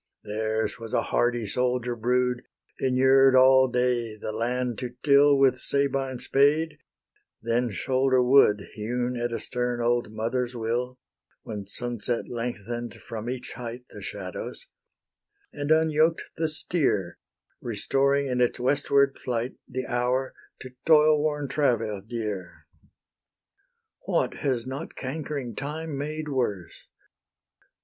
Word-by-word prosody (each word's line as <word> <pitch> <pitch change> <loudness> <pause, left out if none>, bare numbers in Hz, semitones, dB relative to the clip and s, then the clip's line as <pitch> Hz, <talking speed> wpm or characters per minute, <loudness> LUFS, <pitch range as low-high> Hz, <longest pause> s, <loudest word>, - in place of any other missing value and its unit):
Theirs 110 +2 -2
was 115 -1 -4
a - - +2
hardy 120 -2 +1
soldier 125 +2 0
brood, 125 +1 +1 0.4
Inured 130 +1 +5
all 130 0 +7
day 125 -3 0
the 110 - -5
land 120 +1 -2
to 125 -1 -5
till 145 0 +6
With 130 -2 +4
Sabine 135 -2 0
spade, 150 +4 +2 0.6
then 120 +2 0
shoulder 130 +4 +2
wood 125 -5 +5
Hewn 120 +3 -2
at 120 0 -2
a 115 - -1
stern 125 -1 -2
old 120 -1 +1
mother's 120 +3 -2
will, 120 +2 -2 0.5
When 105 -3 -6
sunset 120 +1 -3
lengthen'd 120 0 -4
from 115 -1 -7
each 130 0 -5
height 120 0 -7
The - - -10
shadows, - - -6 0.9
and 145 0 -4
unyoked 160 +1 +2
the 160 - 0
steer, 145 - -1 0.4
Restoring 135 +5 +1
in 125 -2 0
its 120 - +1
westward 140 +1 +2
flight 120 0 -2
The 130 0 -4
hour 125 +2 0 0.3
to 130 - -8
toilworn 150 -2 +4
travail 115 -7 0
dear. 105 -4 -5 1.4
What - - +1
has 130 -5 -1
not 135 +5 -6
cankering 140 -2 -4
Time 150 +2 -4
made 150 +2 -4
worse? 115 - -3
125 Hz, 120 wpm, -26 LUFS, 120-140 Hz, 1.4 s, all